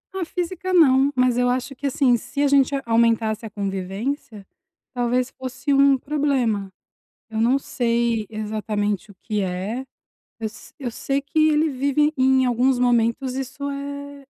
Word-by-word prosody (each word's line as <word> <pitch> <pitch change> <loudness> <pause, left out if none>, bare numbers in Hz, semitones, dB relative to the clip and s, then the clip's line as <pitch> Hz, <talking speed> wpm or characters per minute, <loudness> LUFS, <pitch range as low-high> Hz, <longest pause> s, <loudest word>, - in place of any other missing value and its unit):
Ah, 380 - -1
física 360 +2 -4
não, 275 -5 +5
mas 250 -1 +2
eu 245 0 +3
acho 255 +2 -2
que, 280 +2 -3
assim, 265 -2 +3
se 280 +5 -3
a - - +4
gente 280 0 +3
a 270 - -3
aumentasse 225 -1 +2
a - - -9
convivência, 200 +3 -4 0.5
talvez 245 +1 0
fosse 260 +2 -3
um 275 0 +5
problema. 260 -8 0 0.6
Eu 220 -1 -5
não 240 +4 +3
sei 235 -4 0
exatamente 210 -1 -2
o - - -14
que 210 -2 -1
é, 190 +6 -3 0.6
eu 225 - -4
s 215 +1 -9
eu 260 -4 -3
sei 275 +4 -2
que 310 +2 +2
ele 310 +1 +2
vive 285 +3 +1
em 260 0 +4
alguns 250 +1 +2
momentos, 245 +1 +1
isso 275 +2 -4
é 280 0 -7
255 Hz, 160 wpm, -22 LUFS, 225-280 Hz, 0.6 s, não